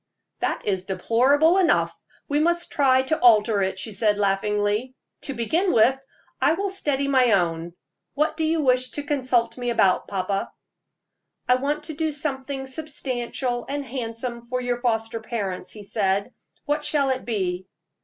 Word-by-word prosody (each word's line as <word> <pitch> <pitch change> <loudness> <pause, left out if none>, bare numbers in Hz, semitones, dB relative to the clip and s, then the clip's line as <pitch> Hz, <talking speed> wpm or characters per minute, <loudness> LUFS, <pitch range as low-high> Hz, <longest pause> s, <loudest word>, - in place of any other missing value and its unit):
"That - - -2
is 190 -3 0
deplorable 265 - +3
enough. 360 - +2 0.3
We 290 +1 +1
must 345 +2 +1
try 260 -2 +3
to 310 +4 0
alter 215 -3 +5
it," 190 0 -1
she 205 +3 -2
said, 210 +1 +2
laughingly. 205 +4 0 0.3
"To 275 - -3
begin 325 - +1
with, 235 +4 +5 0.5
I - - +4
will 395 +3 -2
steady 285 -8 -1
my 255 -4 +4
own. 170 -1 0 0.4
What 305 +2 +1
do 320 - -2
you 315 0 +1
wish 255 -1 +2
to 290 - -4
consult 255 -6 0
me 245 0 -2
about, 195 -6 +2
papa?" 195 0 -2 1.0
"I 250 - +5
want 295 +3 -2
to 310 - -4
do 315 +1 -1
something 275 -2 -2
substantial 260 -3 -3
and 285 0 -3
handsome 235 -1 -5
for 250 +1 -2
your 245 -1 -2
foster 225 -2 -1
parents," 200 -5 -4
he 210 +2 -8
said. 200 +2 -1 0.3
"What 295 +1 -1
shall 280 -3 +2
it 260 0 -2
be?" 185 -5 -2
250 Hz, 160 wpm, -24 LUFS, 210-285 Hz, 1.0 s, alter